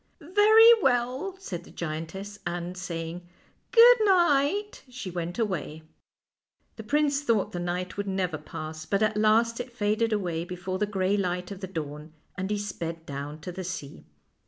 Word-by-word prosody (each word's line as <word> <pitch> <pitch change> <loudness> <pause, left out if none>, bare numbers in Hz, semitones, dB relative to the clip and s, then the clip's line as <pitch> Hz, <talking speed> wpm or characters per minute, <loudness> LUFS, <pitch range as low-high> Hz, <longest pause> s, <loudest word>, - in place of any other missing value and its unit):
" - - -42
Very 420 +7 +7
well," 260 +7 0
said 180 - -6
the - - -15
giantess, 170 +6 -6
and, 175 +1 -4
saying 170 -2 -5 0.3
" - - -41
good 485 +1 +8
night," 370 0 +2
she 245 -7 -7
went 175 0 -4
away. 185 -8 -3 0.9
The - - -8
prince 285 +4 +1
thought 230 -8 +1
the 175 - -4
night 180 +2 -3
would 205 0 -3
never 185 -5 -1
pass, 155 +1 -7
but 200 +1 +1
at 215 0 +1
last 225 +2 +3
it 245 0 -5
faded 220 0 0
aw 210 -2 0
r 180 - -2
ay 165 0 -2
before 180 +1 -5
the 210 - +1
gray 195 -1 0
light 180 -1 -2
of 195 - -7
the 190 - -4
dawn, 155 -3 -6 0.2
and 190 +1 -3
he 210 - 0
sped 170 -5 -5
down 145 +2 -6
to 180 - -6
the 185 +1 -6
sea. 175 -6 -7
190 Hz, 180 wpm, -27 LUFS, 175-240 Hz, 0.9 s, good